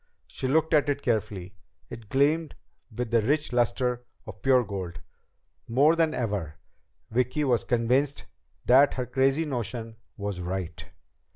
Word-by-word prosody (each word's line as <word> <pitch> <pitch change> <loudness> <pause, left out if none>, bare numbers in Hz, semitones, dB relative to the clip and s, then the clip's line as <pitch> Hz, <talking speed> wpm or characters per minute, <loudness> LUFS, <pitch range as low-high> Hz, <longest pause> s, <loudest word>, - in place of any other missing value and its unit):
She 130 - -4
looked 160 +4 +2
at 145 -1 +4
it 140 0 -1
carefully. 105 -5 -2 0.4
It 115 -3 -9
gleamed 150 +5 +1 0.4
with 120 +1 -4
the 115 -1 +4
rich 145 +4 0
luster 125 0 +1 0.2
of - - -10
pure 130 -2 +4
gold. 95 -6 -6 0.7
More 140 +7 +4
than 160 -2 +1
ever, 100 -10 -2 0.6
Vicki 125 +6 0
was 125 -5 +2
convinced 130 +4 +1 0.4
that 135 +3 +5
her 125 - -2
crazy 135 +5 +1
notion 120 -4 -4 0.2
was 100 -2 -4
right. 90 0 -4
125 Hz, 135 wpm, -27 LUFS, 110-140 Hz, 0.7 s, that